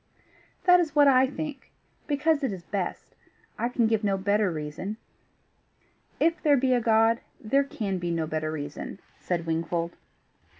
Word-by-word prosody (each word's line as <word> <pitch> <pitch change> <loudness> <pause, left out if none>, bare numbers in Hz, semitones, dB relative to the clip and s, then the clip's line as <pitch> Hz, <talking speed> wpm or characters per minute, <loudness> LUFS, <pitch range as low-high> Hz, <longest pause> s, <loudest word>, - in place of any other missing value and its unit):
"That 360 -1 +7
is 315 -4 -1
what 290 -1 +6
I 260 -1 +5
think 285 0 -6 0.4
because 295 +1 +1
it 265 - +1
is 185 -3 -7
best: 190 0 -4 0.5
I 235 - 0
can 245 -2 +1
give 220 -1 +1
no 200 -1 +1
better 200 +1 +1
reason." 160 +6 -5 1.2
"If 330 +1 +2
there 290 -3 +4
be 260 0 +2
a 245 - +2
God, 225 +1 +3 0.2
there 275 +6 +2
can 205 -8 -3
be 175 0 -3
no 165 -1 0
better 155 0 -2
reason," 145 +4 -6 0.2
said 170 -2 -2
Wingfold. 165 +1 -2
215 Hz, 160 wpm, -27 LUFS, 170-275 Hz, 1.2 s, That